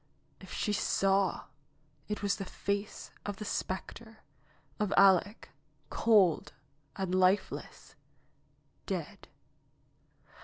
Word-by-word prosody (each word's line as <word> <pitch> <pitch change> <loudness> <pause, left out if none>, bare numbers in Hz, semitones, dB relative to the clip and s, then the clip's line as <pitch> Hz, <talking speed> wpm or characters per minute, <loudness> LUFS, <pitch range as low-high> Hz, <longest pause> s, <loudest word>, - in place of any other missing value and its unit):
If - - -13
she 210 - -1
saw, 195 -1 +1 0.7
it 210 0 -4
was 200 - +1
the - - -4
face 200 +2 -4
of 205 - -4
the 215 - -6
specter, 220 +4 -5 0.6
of 210 -2 0
Aleck, 195 +2 +4 0.4
cold 205 -8 +3 0.4
and 190 -2 -3
lifeless 185 +2 0 0.5
— - - -40
dead - - -5
200 Hz, 100 wpm, -31 LUFS, 190-210 Hz, 0.7 s, Aleck